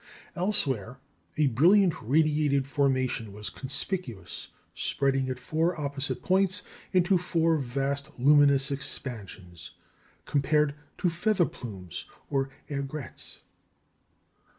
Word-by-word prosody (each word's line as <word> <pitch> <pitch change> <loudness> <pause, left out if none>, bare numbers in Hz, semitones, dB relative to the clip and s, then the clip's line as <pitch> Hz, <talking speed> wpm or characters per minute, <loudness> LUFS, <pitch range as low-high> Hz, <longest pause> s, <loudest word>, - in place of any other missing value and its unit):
Elsewhere, 135 - 0 0.4
a 155 - +4
brilliant 170 - +5
radiated 145 +1 +2
formation 130 -6 0
was 105 +2 -4
conspicuous, 135 - -4 0.3
spreading 135 -1 0
at 130 - -2
four 160 +7 0
opposite 140 0 -3
points 190 +1 +2 0.3
into 185 0 +4
four 165 -2 +2
vast 140 +2 -2
luminous 140 +1 +5
expansions, 100 - -5 0.5
compared 150 +1 +2 0.2
to - - +1
feather 175 +2 +2
plumes 100 - -7 0.3
or 135 -1 +1 0.2
aigrettes. 140 0 -6
140 Hz, 95 wpm, -28 LUFS, 130-160 Hz, 0.5 s, brilliant